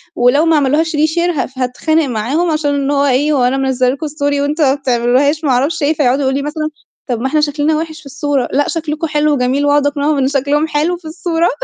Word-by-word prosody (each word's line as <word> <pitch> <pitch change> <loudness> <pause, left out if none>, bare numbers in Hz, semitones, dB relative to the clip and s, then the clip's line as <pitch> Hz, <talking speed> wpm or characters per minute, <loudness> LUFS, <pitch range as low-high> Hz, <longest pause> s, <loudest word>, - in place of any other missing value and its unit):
ولو 250 +6 +3
ما 325 - +3
عملوهاش 300 +3 +1
reshare 315 +3 +1
ها 265 - -1
هاتخانق 305 +5 0
معاهم، 270 +8 -1
عشان 300 -2 0
اللي 280 0 -1
هو 280 0 +2
إيه، 285 +3 +2
"هو 265 -4 +2
أنا 250 +2 +1
منزّلة 260 -2 +1
لكم 280 +4 -3
story 285 -1 -1
وانتم 295 +2 0
ما 265 - +4
بتعملوهاش 270 +3 +1
ما 290 - 0
اعرفش 275 +5 0
إيه؟"، 290 +2 +2
فيقعدوا 280 -2 +1
يقولوا 265 0 0
لي - - -4
مثلًا: 305 +1 -3 0.4
"طب 245 -4 -2
ما 265 - 0
إحنا 305 +3 +1
شكلنا 300 +1 0
وحش 315 0 -5
في - - -18
الصورة."، 280 -2 -2
"لأ 285 +1 +2
شكلكم 320 -1 -3
حلو 300 0 +1
و - - +1
جميل."، 260 +3 0
وأقعد 290 0 +3
أقنعهم 290 +1 0
إن 265 - +1
شكلهم 285 +3 0
حلو 315 +4 0
في 345 - -22
الصورة، 330 +1 -1
290 Hz, 230 wpm, -15 LUFS, 270-310 Hz, 0.4 s, ما